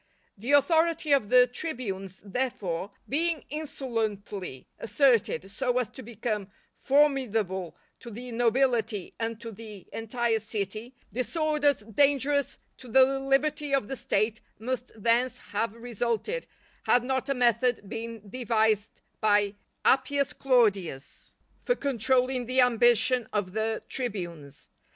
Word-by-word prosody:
The 235 Hz, +8 st, -2 dB
authority 320 Hz, +2 st, +3 dB
of 270 Hz, -8 st, +3 dB
the 250 Hz, 0 st, +7 dB
tribunes, 230 Hz, -, -5 dB
therefore, 200 Hz, -5 st, -2 dB, 0.2 s
being 325 Hz, +2 st, 0 dB
insolently 220 Hz, -, -4 dB
asserted 230 Hz, -5 st, +2 dB
so 250 Hz, +4 st, 0 dB
as 250 Hz, -3 st, 0 dB
to 260 Hz, -, -10 dB
become 215 Hz, -3 st, -4 dB, 0.3 s
formidable 225 Hz, -, +1 dB, 0.2 s
to 240 Hz, -, -10 dB
the 240 Hz, +3 st, -8 dB
nobility 235 Hz, -3 st, +1 dB
and 225 Hz, -1 st, -2 dB
to 230 Hz, 0 st, -7 dB
the 210 Hz, -3 st, -10 dB
entire 225 Hz, 0 st, 0 dB
city, 215 Hz, +3 st, -5 dB, 0.2 s
disorders 295 Hz, +2 st, +1 dB
dangerous 280 Hz, +5 st, +1 dB, 0.2 s
to 255 Hz, -, -13 dB
the 265 Hz, +3 st, +4 dB
liberty 275 Hz, +1 st, +1 dB
of 270 Hz, -7 st, -1 dB
the 270 Hz, -, -4 dB
State 215 Hz, -1 st, 0 dB, 0.2 s
must 250 Hz, +2 st, -4 dB
thence 235 Hz, +3 st, +1 dB
have 215 Hz, +1 st, -3 dB
resulted, 240 Hz, -, -2 dB, 0.4 s
had 245 Hz, -, +4 dB
not 260 Hz, +1 st, -1 dB
a 275 Hz, -, +1 dB
method 240 Hz, -2 st, +2 dB
been 225 Hz, -1 st, -6 dB
devised 220 Hz, -2 st, 0 dB, 0.2 s
by 205 Hz, -2 st, +3 dB, 0.3 s
Appius 275 Hz, +1 st, +2 dB
Claudius 200 Hz, -, 0 dB, 0.3 s
for -, -, +2 dB
controlling 255 Hz, -, 0 dB
the 255 Hz, +1 st, +1 dB
ambition 240 Hz, 0 st, +3 dB
of 205 Hz, -3 st, -1 dB
the 220 Hz, +1 st, -1 dB
tribunes. 175 Hz, -, -6 dB
240 Hz, 120 wpm, -28 LUFS, 215-265 Hz, 0.4 s, the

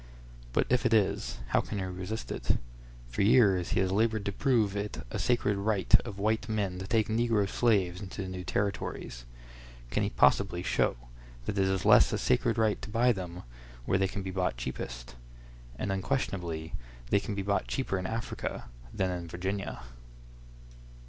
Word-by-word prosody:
But -, -, +2 dB
if 125 Hz, +1 st, +2 dB
it 120 Hz, -3 st, +4 dB
is, 65 Hz, -, +1 dB
how -, -, +3 dB
can 105 Hz, -, -5 dB
he 95 Hz, -, -1 dB
resist 90 Hz, -, -5 dB
it? -, -, 0 dB, 0.5 s
For -, -, -2 dB
years 100 Hz, -4 st, +5 dB
he -, -, +4 dB
has 95 Hz, -1 st, +1 dB
labored 110 Hz, +1 st, +1 dB
to 100 Hz, -, 0 dB
prove 110 Hz, -3 st, +2 dB
it 100 Hz, -7 st, -4 dB
a -, -, -3 dB
sacred 110 Hz, -5 st, +1 dB
right 100 Hz, -1 st, -1 dB
of 105 Hz, -5 st, -7 dB
white 110 Hz, +2 st, 0 dB
men 100 Hz, -4 st, -1 dB
to 95 Hz, -, -6 dB
take 110 Hz, -2 st, +2 dB
negro 110 Hz, -2 st, +2 dB
slaves 95 Hz, -6 st, +1 dB
into 100 Hz, 0 st, -5 dB
the -, -, -5 dB
new 95 Hz, 0 st, -5 dB
Territories. 100 Hz, -11 st, -3 dB, 0.7 s
Can -, -, +1 dB
he -, -, +1 dB
possibly 85 Hz, +8 st, +3 dB
show -, -, +1 dB, 0.5 s
that -, -, -2 dB
it 95 Hz, -, +3 dB
is 95 Hz, -2 st, -1 dB
less -, -, +7 dB
a -, -, 0 dB
sacred 65 Hz, -, +1 dB
right 110 Hz, -2 st, +2 dB
to 105 Hz, -, -7 dB
buy 120 Hz, +3 st, +3 dB
them 90 Hz, -4 st, -5 dB, 0.4 s
where 95 Hz, -, +2 dB
they 95 Hz, -, +3 dB
can 100 Hz, +1 st, -5 dB
be 95 Hz, -, -4 dB
bought 90 Hz, -8 st, -1 dB
cheapest? -, -, -6 dB, 0.6 s
And 100 Hz, -, -2 dB
unquestionably 90 Hz, -, -2 dB, 0.4 s
they -, -, +5 dB
can 100 Hz, +1 st, -4 dB
be 100 Hz, -, -2 dB
bought 100 Hz, +1 st, 0 dB
cheaper 115 Hz, -8 st, -1 dB
in 90 Hz, -, -3 dB
Africa 115 Hz, -, -4 dB, 0.2 s
than 95 Hz, -1 st, 0 dB
in 90 Hz, -1 st, -4 dB
Virginia. 95 Hz, -2 st, -4 dB
100 Hz, 180 wpm, -30 LUFS, 90-110 Hz, 0.7 s, less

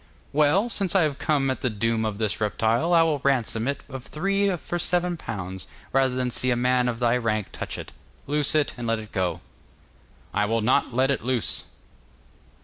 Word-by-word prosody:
'Well, 155 Hz, +9 st, +4 dB
since 195 Hz, -6 st, -2 dB
I 190 Hz, -, +6 dB
have 145 Hz, -3 st, -1 dB
come 140 Hz, -3 st, +1 dB
at 130 Hz, -, -4 dB
the 130 Hz, -, +1 dB
doom 115 Hz, +1 st, 0 dB
of 105 Hz, -2 st, -2 dB
this 110 Hz, -1 st, -2 dB
reptile, 115 Hz, +8 st, +1 dB
I 165 Hz, -1 st, +6 dB
will 155 Hz, -3 st, +1 dB
ransom 125 Hz, -4 st, 0 dB
it 140 Hz, -, -2 dB
of 130 Hz, -2 st, -8 dB
thee 195 Hz, +3 st, +1 dB
for 175 Hz, +1 st, -4 dB
seven 175 Hz, 0 st, +1 dB
pounds, 95 Hz, -, -5 dB, 0.3 s
rather 135 Hz, -1 st, +3 dB
than 125 Hz, -1 st, -1 dB
see 130 Hz, -, +1 dB
a 125 Hz, -, +3 dB
man 125 Hz, 0 st, +2 dB
of 115 Hz, -1 st, -3 dB
thy 120 Hz, -1 st, +3 dB
rank 110 Hz, -4 st, -1 dB
touch -, -, -5 dB
it. -, -, -8 dB, 0.3 s
Loose 150 Hz, +1 st, +1 dB
it, 150 Hz, -2 st, +2 dB
and 120 Hz, -1 st, -4 dB
let 115 Hz, 0 st, +2 dB
it 110 Hz, -1 st, -9 dB
go.' 95 Hz, -3 st, -1 dB, 0.9 s
'I 105 Hz, +1 st, +2 dB
will 115 Hz, +2 st, 0 dB
not 125 Hz, +4 st, +2 dB
let 130 Hz, +3 st, +2 dB
it 135 Hz, -, -1 dB
loose. 125 Hz, -2 st, 0 dB
125 Hz, 200 wpm, -25 LUFS, 115-150 Hz, 0.9 s, I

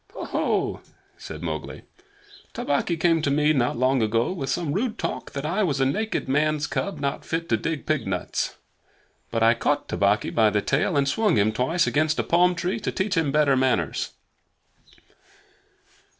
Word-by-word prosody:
"Ho! -, -, -6 dB
ho!" -, -, -1 dB, 0.3 s
said -, -, -9 dB
Mowgli. -, -, -5 dB, 0.7 s
"Tabaqui 170 Hz, -, 0 dB
came 165 Hz, -1 st, +3 dB
to 145 Hz, -, 0 dB
me 150 Hz, +2 st, +3 dB
not 125 Hz, -4 st, 0 dB
long 130 Hz, +1 st, +2 dB
ago 115 Hz, +5 st, +1 dB
with 140 Hz, -8 st, -4 dB
some 145 Hz, +1 st, -1 dB
rude 225 Hz, +3 st, -1 dB
talk -, -, -4 dB
that 140 Hz, +1 st, -4 dB
I 180 Hz, +7 st, 0 dB
was 150 Hz, -9 st, 0 dB
a 135 Hz, -, +3 dB
naked 215 Hz, +8 st, -1 dB
man's 150 Hz, +2 st, +1 dB
cub 200 Hz, +5 st, -2 dB
and -, -, -10 dB
not 140 Hz, -1 st, -2 dB
fit 165 Hz, +1 st, -3 dB
to 115 Hz, -, +3 dB
dig 155 Hz, +6 st, -3 dB
pig 155 Hz, -8 st, -1 dB
nuts. 90 Hz, -2 st, -2 dB, 0.7 s
But 115 Hz, -1 st, 0 dB
I 115 Hz, +1 st, +6 dB
caught 145 Hz, +4 st, -1 dB
Tabaqui 100 Hz, +1 st, +1 dB
by 110 Hz, -2 st, +4 dB
the 105 Hz, -, +1 dB
tail 140 Hz, -, 0 dB
and 140 Hz, -1 st, +2 dB
swung 210 Hz, +3 st, +2 dB
him 105 Hz, +2 st, +3 dB
twice 160 Hz, +10 st, +1 dB
against 155 Hz, +1 st, +1 dB
a -, -, +1 dB
palm 180 Hz, +1 st, +3 dB
tree 180 Hz, +6 st, -2 dB
to 210 Hz, -, -2 dB
teach 190 Hz, +1 st, -1 dB
him 160 Hz, -4 st, +1 dB
better 145 Hz, -2 st, +3 dB
manners." 130 Hz, -, 0 dB
145 Hz, 180 wpm, -24 LUFS, 130-170 Hz, 0.7 s, I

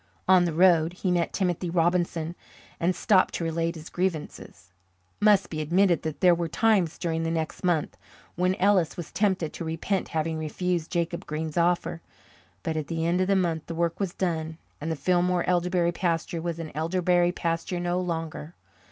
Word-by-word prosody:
On 185 Hz, -2 st, +6 dB
the 170 Hz, -, -1 dB
road 170 Hz, -1 st, +4 dB
he 180 Hz, 0 st, -2 dB
met 175 Hz, -1 st, +1 dB
Timothy 180 Hz, -2 st, -1 dB
Robinson 170 Hz, -1 st, 0 dB, 0.5 s
and 175 Hz, +2 st, +1 dB
stopped 185 Hz, +1 st, +3 dB
to -, -, -2 dB
relate 165 Hz, +1 st, -1 dB
his 160 Hz, 0 st, -9 dB
grievances. 155 Hz, -, -4 dB, 0.5 s
It -, -, -3 dB
must 205 Hz, -3 st, +4 dB
be 155 Hz, -1 st, -3 dB
admitted 175 Hz, +3 st, +3 dB
that 160 Hz, -2 st, -5 dB
there 180 Hz, -2 st, +6 dB
were 170 Hz, 0 st, -1 dB
times 190 Hz, -2 st, +2 dB
during 165 Hz, -2 st, -2 dB
the 165 Hz, -, -1 dB
next 160 Hz, -1 st, -3 dB
month 175 Hz, -4 st, 0 dB, 0.4 s
when 180 Hz, +2 st, +1 dB
Ellis 190 Hz, -4 st, +2 dB
was 175 Hz, -, -6 dB
tempted 190 Hz, -6 st, 0 dB
to -, -, -6 dB
repent 165 Hz, +4 st, -2 dB
having 160 Hz, 0 st, -2 dB
refused 170 Hz, +2 st, -2 dB
Jacob 170 Hz, -1 st, -2 dB
Green's 155 Hz, 0 st, -4 dB
offer. 170 Hz, -1 st, +1 dB, 0.6 s
But 160 Hz, -1 st, -2 dB
at 155 Hz, -, -3 dB
the 165 Hz, -1 st, -2 dB
end 175 Hz, +2 st, +2 dB
of 185 Hz, -, +1 dB
the 195 Hz, -, +3 dB
month 170 Hz, -4 st, 0 dB
the 165 Hz, -, -5 dB
work 170 Hz, 0 st, -1 dB
was 195 Hz, -3 st, -2 dB
done 160 Hz, -3 st, -2 dB, 0.2 s
and 160 Hz, +2 st, -2 dB
the -, -, -1 dB
Fillmore 180 Hz, +3 st, +1 dB
elderberry 180 Hz, -1 st, +2 dB
pasture 170 Hz, -1 st, -1 dB
was 170 Hz, -1 st, -3 dB
an 165 Hz, -2 st, -6 dB
elderberry 175 Hz, +2 st, +2 dB
pasture 170 Hz, 0 st, -2 dB
no 175 Hz, +1 st, 0 dB
longer. 165 Hz, -2 st, -4 dB
170 Hz, 185 wpm, -26 LUFS, 160-180 Hz, 0.6 s, On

